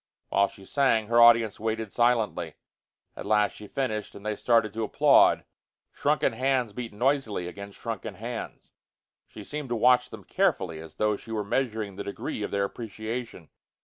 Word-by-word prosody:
While 100 +1 +3
she 95 - -15
sang, 120 -5 +2
her 120 0 +5
audience 115 -3 +6
waited 110 -1 -3
silently. 120 -2 +1 0.6
At - - -7
last 105 -1 +3
she 105 - -10
finished, 110 -4 -3
and 100 - -11
they 105 0 -1
started 115 -2 +2
to 110 0 -2
applaud. - - +4 0.5
Shrunken - - +1
hands 130 -4 0
beat 120 +1 -6
noisily 115 -5 0
against 100 +2 -9
shrunken - - -5
hands. - - -7 0.6
She - - -11
seemed 150 -3 -6
to 120 - 0
watch 125 +2 +4
them 110 -4 -10
carefully, 80 -2 0
as 80 0 -11
though 105 -1 +1
she 115 - -12
were 110 -2 -1
measuring 110 -4 -2
the 100 - -4
degree 100 - -5
of 105 - -2
their 100 0 0
appreciation. 110 -3 -6
110 Hz, 170 wpm, -27 LUFS, 100-120 Hz, 0.6 s, audience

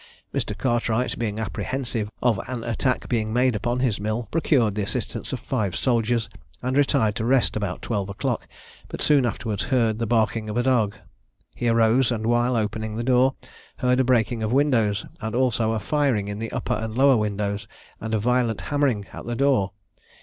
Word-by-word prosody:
Mr. - - -2
Cartwright 120 -1 0
being 110 -2 -2
apprehensive 115 -1 -3
of 115 -5 +2
an 125 -3 -4
attack 120 +2 -1
being 110 -3 0
made 125 +1 +2
upon 120 +4 -1
his 120 -7 +1
mill, 110 +3 -2
procured 135 -10 +2
the 105 - -2
assistance 100 - -4
of - - -3
five 100 -5 -2
soldiers, 115 -2 +1 0.4
and 130 +1 -1
retired 135 -7 +2
to 110 - -2
rest 130 +2 +2
about 100 -4 -3
twelve 100 -4 -2
o'clock, 100 - -2 0.4
but - - -7
soon 140 -5 +3
afterwards 110 -1 -3
heard 115 -5 +1
the 115 - -1
barking 110 -1 +1
of 105 - -3
a 120 - +2
dog. 115 -5 +2 0.6
He 120 - -2
arose; 115 +2 +3
and 110 -2 -2
while 120 +2 +2
opening 110 0 -2
the 115 - -2
door, 130 +1 +3 0.4
heard 125 0 +2
a - - +5
breaking 120 -2 +2
of 110 0 -1
windows, 120 -7 +2 0.2
and 110 +1 -3
also 120 -3 +2
a 110 - -1
firing 135 -7 +1
in 105 0 -4
the 115 0 -4
upper 125 - -2
and 110 +1 -3
lower 135 -1 +6
windows, 105 -1 -2 0.3
and 110 0 -2
a - - +1
violent 120 0 +1
hammering 140 -8 0
at - - -8
the 120 - -2
door. 130 -7 +2
115 Hz, 185 wpm, -24 LUFS, 110-125 Hz, 0.6 s, lower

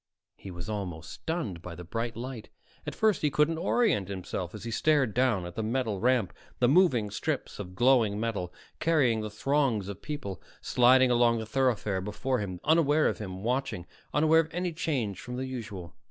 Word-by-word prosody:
He 100 - -10
was 85 0 -7
almost 90 -7 -5
stunned 130 - -4
by 85 -1 -8
the 90 - -8
bright 115 +5 -4
light. 120 -2 -6 0.4
At - - -4
first 215 -2 +2
he 150 - +2
couldn't 150 +3 +1
orient 185 - +2
himself 95 -1 -5
as 105 - -8
he 115 - -4
stared 140 -2 +2
down 120 -7 +2
at 90 - -7
the 110 - -3
metal 110 -2 -1
ramp, 125 -4 +2 0.2
the 125 - +3
moving 130 - +4
strips - - -3
of 90 0 -7
glowing 120 -4 +3
metal 105 -6 -2 0.3
carrying 135 -9 +2
the 110 - -4
throngs 120 -2 0
of 100 - -7
people, 100 - -5 0.2
sliding 125 +1 +4
along 120 -1 +4
the 110 - -4
thoroughfare 110 -5 0
before 125 +6 -2
him, 95 -4 -4
unaware 155 -1 +4
of - - -2
him 95 -2 -6
watching, 125 -7 -1 0.3
unaware 160 +2 +4
of 165 -1 0
any 175 0 -2
change 130 - -2
from 125 0 -6
the 130 +1 -3
usual. 105 -10 -7
115 Hz, 185 wpm, -29 LUFS, 100-135 Hz, 0.4 s, moving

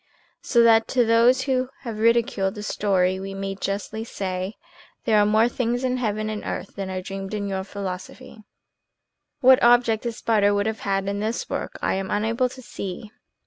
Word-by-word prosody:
So 235 -1 +3
that 225 -1 +5
to 245 -2 +2
those 235 +3 +4
who 255 -1 0
have 230 -5 -6
ridiculed 225 -3 +2
the 210 - -6
story 190 -3 +1
we 195 0 -6
may 195 0 -3
justly 200 +3 -4
say: 190 -2 -4 0.5
"There 220 -3 +4
are 205 - +4
more 220 +2 +4
things 245 0 -1
in 255 0 0
heaven 215 -3 -1
and 215 -1 -4
earth - - -5
than 195 -1 -4
are 185 -1 -4
dreamed 195 +1 -5
of - - -1
in 200 -1 -3
your 190 -1 -2
philosophy." 200 +5 -7 1.0
What 260 0 +7
object 240 -2 +4
the 235 - -2
spider 210 -2 +2
could 205 0 +1
have 220 0 -2
had 195 -1 -1
in 200 0 -2
this 220 +3 -2
work - - -4
I - - +1
am 190 0 -3
unable 225 +5 0
to 255 +1 -12
see. 210 0 -7
215 Hz, 190 wpm, -24 LUFS, 195-235 Hz, 1.0 s, What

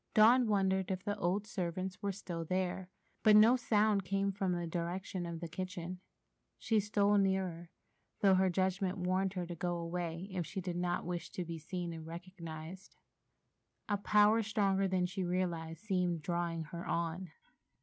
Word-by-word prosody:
Dawn 235 +3 +7
wondered 190 -3 +2
if 185 0 -2
the 205 - -1
old 190 +4 0
servants 185 0 -3
were 200 -1 0
still 175 -3 -5
there, 185 +1 -2 0.3
but 215 -1 +6
no 220 +4 +8
sound 215 -4 +2
came 195 +1 0
from 195 -1 -1
the 175 -1 -1
direction 175 +2 -3
of 170 -1 -5
the 170 - -3
kitchen. 185 +1 -5 0.6
She 220 -2 +2
stole 205 0 +3
nearer, 190 -3 0 0.5
though 195 -2 +6
her 190 0 +4
judgment 190 +1 0
warned 185 +1 0
her 180 -2 -3
to 175 - -6
go 175 +1 -2
away 170 +1 -3
if 185 -2 -1
she 165 +4 -5
did 180 -1 -4
not 175 0 -1
wish 175 0 -4
to 180 - -3
be 165 -1 -5
seen 175 +1 -4
and 160 -1 -8
recognized. 170 +1 -8 0.9
A 205 - +1
power 210 +2 +5
stronger 200 -2 +1
than 185 -1 +1
she 185 +1 -3
realized 170 -2 -2
seemed 180 -6 0
drawing 170 0 -1
her 170 +3 -7
on. 170 +2 -2
185 Hz, 170 wpm, -34 LUFS, 170-195 Hz, 0.9 s, no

